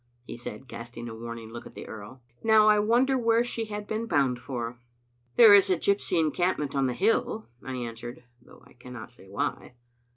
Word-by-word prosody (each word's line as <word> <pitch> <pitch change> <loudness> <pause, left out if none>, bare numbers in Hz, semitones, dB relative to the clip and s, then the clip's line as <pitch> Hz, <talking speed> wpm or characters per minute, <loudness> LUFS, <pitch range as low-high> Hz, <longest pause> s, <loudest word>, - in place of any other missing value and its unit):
he - - -7
said, 120 +1 -8
casting 120 0 -8
a 115 - -6
warning 115 0 -8
look 120 - -8
at - - -16
the - - -8
earl. 110 +4 -10
" 120 - -33
Now 220 -1 +6
I 210 0 +5
won 230 +5 +3
der 265 -1 +1
where 230 0 +3
she 230 -2 -3
had 210 -1 -6
been 220 +2 -3
bound 135 - +1
for." 120 -2 -5 0.6
"There 225 -3 +9
is 200 -1 +7
a 185 - +3
gypsy 200 -1 +1
encampment 155 -2 0
on 135 -1 +2
the 125 - -2
hill," 215 - 0
I 130 - -5
an 120 -2 -4
swered, 120 +2 -9 0.2
though - - -18
I - - -19
cannot 125 -1 -10
say 95 -6 -16
why. 120 +5 -3
135 Hz, 215 wpm, -27 LUFS, -, 0.6 s, There